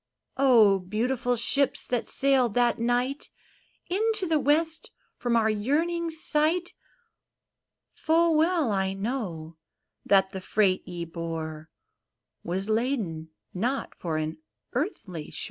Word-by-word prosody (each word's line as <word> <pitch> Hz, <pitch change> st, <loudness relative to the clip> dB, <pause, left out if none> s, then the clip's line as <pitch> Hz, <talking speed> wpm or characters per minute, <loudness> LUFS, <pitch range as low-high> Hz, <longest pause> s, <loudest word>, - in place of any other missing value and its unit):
Oh, 230 Hz, -8 st, +5 dB
beautiful 245 Hz, +6 st, -1 dB
ships, 275 Hz, +4 st, +2 dB
that 245 Hz, -2 st, -1 dB
sailed 265 Hz, -5 st, +2 dB
that 240 Hz, -1 st, +2 dB
night 245 Hz, +4 st, -1 dB, 0.6 s
Into 430 Hz, +2 st, 0 dB
the 320 Hz, -3 st, +2 dB
west 315 Hz, +3 st, +1 dB, 0.3 s
from 240 Hz, -1 st, -1 dB
our 225 Hz, -1 st, +3 dB
yearning 315 Hz, +11 st, 0 dB
sight. 320 Hz, +2 st, 0 dB, 1.2 s
Full 330 Hz, +1 st, +2 dB
well 315 Hz, -4 st, +2 dB
I 190 Hz, -1 st, 0 dB
know 195 Hz, -7 st, -4 dB, 0.5 s
that 190 Hz, -1 st, +3 dB
the 190 Hz, -2 st, -6 dB
freight 190 Hz, -1 st, +1 dB
ye 175 Hz, -1 st, -5 dB
bore 160 Hz, -2 st, -6 dB, 0.7 s
Was 185 Hz, +4 st, -2 dB
laden 215 Hz, -, -1 dB, 0.2 s
not 245 Hz, +9 st, -2 dB
for 165 Hz, -3 st, -3 dB
an 155 Hz, +1 st, -3 dB, 0.3 s
earthly 205 Hz, -, -4 dB
shore -, -, -5 dB
240 Hz, 115 wpm, -27 LUFS, 190-295 Hz, 1.2 s, Oh